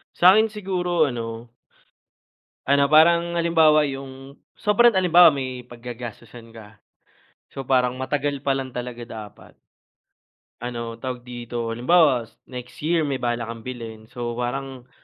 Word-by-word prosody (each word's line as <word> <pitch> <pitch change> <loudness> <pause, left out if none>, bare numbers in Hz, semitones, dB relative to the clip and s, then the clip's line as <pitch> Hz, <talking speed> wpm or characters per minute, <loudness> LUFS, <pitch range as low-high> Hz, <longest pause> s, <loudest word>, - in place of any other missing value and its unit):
Sa'kin 200 +5 +6
siguro 180 -5 -1
ano, 115 -1 -6 1.2
ano 140 0 +4
parang 170 +2 +5
halimbawa 160 -3 +4
yung 135 0 -9 0.2
sobrang 235 +3 +4
halimbawa, 175 -3 +6
may 130 -3 -5
paggagastusan 120 -1 -10
ka, 110 -2 -14 0.7
so 135 -1 -7
parang 125 -1 +1
matagal 140 +2 -2
pa 140 - +2
lang 135 -1 -4
talaga 125 -1 -6
dapat. 110 -3 -11 1.0
Ano, 120 -1 -5
tawag 125 +1 -5
dito, 120 -1 -6
halimbawa, 125 +1 +3 0.2
next 125 -1 -9
year 160 +1 +1
may 135 -3 -3
balak 120 -1 -1
kang 115 0 -8
bilhin, 115 -3 -8
so 120 -1 -5
parang, 125 +1 -5
130 Hz, 125 wpm, -23 LUFS, 120-155 Hz, 1.2 s, Sa'kin